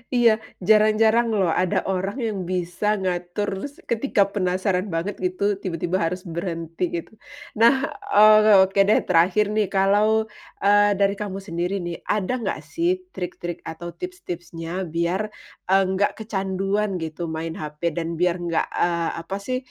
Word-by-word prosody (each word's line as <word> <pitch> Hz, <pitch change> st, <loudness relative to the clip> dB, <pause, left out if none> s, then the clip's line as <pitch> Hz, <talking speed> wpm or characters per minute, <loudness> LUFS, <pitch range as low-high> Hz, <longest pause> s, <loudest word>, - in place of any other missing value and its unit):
Iya, 240 Hz, -2 st, +6 dB, 0.4 s
jarang-jarang 220 Hz, +2 st, +5 dB
loh 180 Hz, -4 st, +2 dB
ada 185 Hz, +2 st, 0 dB
orang 190 Hz, +4 st, -2 dB
yang 210 Hz, -3 st, -3 dB
bisa 185 Hz, +4 st, -1 dB
ngatur 180 Hz, +2 st, -2 dB, 0.2 s
s 285 Hz, -, -22 dB
ketika 230 Hz, -2 st, 0 dB
penasaran 185 Hz, 0 st, 0 dB
banget 170 Hz, +5 st, -2 dB
gitu, 185 Hz, +2 st, -2 dB, 0.2 s
tiba-tiba 175 Hz, 0 st, -2 dB
harus 180 Hz, +2 st, -3 dB
berhenti, 165 Hz, -1 st, -4 dB
gitu. 170 Hz, -, -8 dB, 0.5 s
Nah, 235 Hz, +4 st, +8 dB, 0.4 s
eee, 215 Hz, -1 st, +8 dB
oke, 195 Hz, +1 st, -3 dB
deh, 215 Hz, -, +5 dB
terakhir 180 Hz, +5 st, +3 dB
nih, 215 Hz, -2 st, +2 dB
kalau, 210 Hz, +3 st, +3 dB, 0.4 s
eee, 205 Hz, 0 st, +5 dB
dari 200 Hz, 0 st, +3 dB
kamu 195 Hz, -2 st, -4 dB
sendiri 175 Hz, +3 st, -2 dB
nih, 170 Hz, -1 st, -5 dB
ada 210 Hz, +3 st, 0 dB
nggak 195 Hz, -, -2 dB, 0.2 s
sih 340 Hz, +1 st, +1 dB, 0.2 s
trik-trik 175 Hz, -1 st, -5 dB
atau 170 Hz, +1 st, -7 dB
tips-tipsnya 175 Hz, -, -6 dB
biar, 170 Hz, +4 st, 0 dB, 0.5 s
eee, 195 Hz, +1 st, +5 dB
nggak 200 Hz, +2 st, +2 dB
kecanduan 195 Hz, -1 st, -1 dB
gitu, 160 Hz, 0 st, -6 dB
main 160 Hz, +1 st, -4 dB
HP 155 Hz, +1 st, -4 dB
dan 165 Hz, +1 st, -3 dB
biar 180 Hz, 0 st, +2 dB
nggak, 170 Hz, -1 st, 0 dB, 0.2 s
eee, 170 Hz, -1 st, +1 dB
apa 190 Hz, +4 st, -5 dB
sih, 255 Hz, 0 st, -1 dB
190 Hz, 145 wpm, -23 LUFS, 175-210 Hz, 0.5 s, Nah